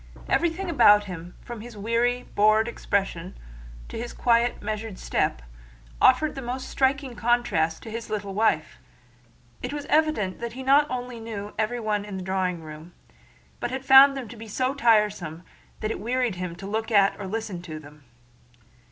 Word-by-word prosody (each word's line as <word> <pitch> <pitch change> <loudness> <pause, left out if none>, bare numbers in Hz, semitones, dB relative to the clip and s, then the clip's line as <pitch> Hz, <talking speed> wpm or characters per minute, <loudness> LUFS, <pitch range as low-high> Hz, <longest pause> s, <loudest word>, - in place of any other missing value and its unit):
Everything 345 +3 0
about 220 -10 +6
him, 180 -3 -8
from 235 -3 -7
his 235 -1 -10
weary, 235 +4 0
bored 215 +2 +4
expression 195 -5 -2 0.5
to - - -6
his 235 +1 -5
quiet, 235 0 +2
measured 215 -1 -4
step, - - -1 0.6
offered 295 +5 +4
a 270 - -5
most 255 +1 -4
striking 265 -1 0
contrast 215 -10 +1
to 225 - -8
his 230 +1 -5
quiet, - - -1
little 200 -1 -7
wife. 190 -7 +1 0.8
It 250 - -4
was 290 -1 -5
evident 305 -12 +2
that 235 -1 -5
he 260 +2 -7
not 285 +3 +4
only 245 -1 -5
knew 210 -2 -6
everyone 215 -2 -1
in 205 -2 -6
the 185 - -5
drawing 180 -2 -1
room, 155 +2 -10 0.7
but 240 - -2
had 265 +1 -5
found 275 +1 +8
them 255 -4 -5
to 240 - -9
be 225 0 -10
so 255 +5 -1
tiresome 210 - +2 0.4
that 215 0 -1
it - - -4
wearied 245 +1 0
him 180 -1 -5
to 195 - -9
look 220 +3 -2
at 200 -3 +4
or 200 - -5
listen 205 -3 -4
to 160 -3 -7
them. 150 -1 -14
220 Hz, 175 wpm, -25 LUFS, 195-245 Hz, 0.8 s, found